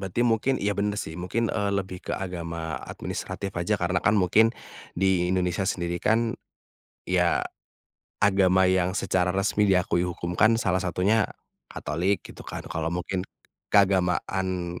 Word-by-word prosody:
Berarti 95 Hz, +4 st, -3 dB
mungkin 120 Hz, +3 st, +2 dB
iya 105 Hz, -, +1 dB
bener 105 Hz, +1 st, -1 dB
sih 80 Hz, -5 st, -4 dB
mungkin, 110 Hz, +6 st, -1 dB
eee, 100 Hz, -2 st, 0 dB
lebih 95 Hz, -2 st, -3 dB
ke -, -, -5 dB
agama 85 Hz, -3 st, -4 dB
administratif 100 Hz, -1 st, -5 dB
aja 100 Hz, +5 st, +1 dB
karena 90 Hz, 0 st, +1 dB
kan 105 Hz, +1 st, +3 dB
mungkin, 110 Hz, +5 st, +4 dB, 0.4 s
di 90 Hz, -1 st, +2 dB
Indonesia 90 Hz, 0 st, 0 dB
sendiri 85 Hz, -1 st, -2 dB
kan, 115 Hz, +1 st, +2 dB, 0.7 s
ya, 90 Hz, -1 st, +2 dB, 0.8 s
agama 95 Hz, -2 st, +4 dB
yang 90 Hz, -1 st, +2 dB
secara 90 Hz, -1 st, +1 dB
resmi 100 Hz, +2 st, +1 dB
diakui 90 Hz, -2 st, +2 dB
hukum 90 Hz, 0 st, -4 dB
kan 115 Hz, +1 st, +5 dB
salah 95 Hz, -4 st, +1 dB
satunya, 95 Hz, +4 st, +2 dB, 0.4 s
Katolik 95 Hz, +6 st, -1 dB
gitu -, -, -11 dB
kan -, -, -6 dB
kalau 80 Hz, 0 st, -2 dB
mungkin, 90 Hz, +1 st, -2 dB, 0.4 s
keagamaan 95 Hz, -2 st, +1 dB
95 Hz, 140 wpm, -26 LUFS, 90-100 Hz, 0.8 s, kan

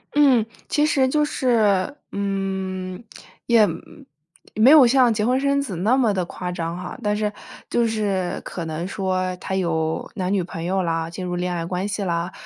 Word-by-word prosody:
嗯。 270 Hz, -6 st, +5 dB, 0.2 s
其 295 Hz, -, +2 dB
实 275 Hz, -4 st, +2 dB
就 300 Hz, +3 st, +2 dB
是， 230 Hz, -4 st, +1 dB, 0.2 s
嗯， 190 Hz, -1 st, -3 dB, 0.4 s
也 230 Hz, -3 st, +5 dB, 0.9 s
没 230 Hz, +6 st, +6 dB
有 300 Hz, -4 st, +9 dB
像 250 Hz, -2 st, +4 dB
结 210 Hz, -1 st, 0 dB
婚 255 Hz, +2 st, +2 dB
生 280 Hz, 0 st, +1 dB
子 230 Hz, -10 st, -5 dB
那 215 Hz, +8 st, +2 dB
么 235 Hz, -5 st, +3 dB
地 185 Hz, -2 st, 0 dB
夸 180 Hz, +1 st, -5 dB
张 170 Hz, -1 st, -3 dB
哈， 180 Hz, -, -7 dB
但 210 Hz, 0 st, +1 dB
是 210 Hz, 0 st, -1 dB, 0.4 s
就 235 Hz, -, +2 dB
是 200 Hz, -5 st, -1 dB
可 170 Hz, -3 st, -6 dB
能 160 Hz, +3 st, -4 dB
说 185 Hz, -2 st, -1 dB
他 190 Hz, -, -4 dB
有 160 Hz, -3 st, -1 dB
男 185 Hz, -1 st, -2 dB
女 190 Hz, -3 st, +1 dB
朋 165 Hz, -1 st, -7 dB
友 190 Hz, +2 st, 0 dB
啦， 165 Hz, -1 st, -1 dB
进 185 Hz, +2 st, -7 dB
入 180 Hz, 0 st, -3 dB
恋 180 Hz, 0 st, -2 dB
爱 165 Hz, -1 st, -3 dB
关 180 Hz, +3 st, -2 dB
系 205 Hz, 0 st, -3 dB
啦。 170 Hz, 0 st, -2 dB
195 Hz, 200 characters per minute, -22 LUFS, 180-230 Hz, 0.9 s, 有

